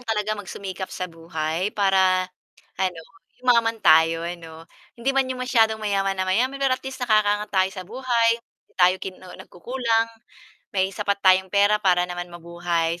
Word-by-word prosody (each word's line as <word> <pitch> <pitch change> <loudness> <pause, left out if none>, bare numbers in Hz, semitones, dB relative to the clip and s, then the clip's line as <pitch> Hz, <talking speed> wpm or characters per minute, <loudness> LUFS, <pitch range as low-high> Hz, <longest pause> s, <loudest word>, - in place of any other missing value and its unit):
talaga 215 -3 -1
magsumikap 195 -2 -6
sa 185 - -5
buhay 165 +1 -3
para 190 -2 +3 0.6
ano 185 -3 -1 0.4
yumaman 235 -2 +2
tayo 165 +1 +5
ano. 165 -2 -8 0.3
Hindi 245 +3 -1
'man 270 -1 +1
yung 255 -1 -4
masyadong 225 -3 +3
mayaman 195 -2 -1
na 190 - -1
mayaman, 240 +9 +1
pero 275 -1 +1
at 255 - -1
least 265 -1 -5
nakakaangat 210 -2 +2
tayo 190 -1 +3
sa 185 -1 -8
buhay, 235 +2 +1
hindi - - -40
tayo 180 +1 +5
kinu 185 -1 -9 0.2
nagkukulang, 230 +3 -1 0.7
may 190 0 +1
sapat 200 0 -1
tayong 190 0 +5
pera 205 +2 +3
para 180 -3 +3
naman 175 0 -6
mabuhay. 170 -1 -2
195 Hz, 155 wpm, -23 LUFS, 180-225 Hz, 0.7 s, tayo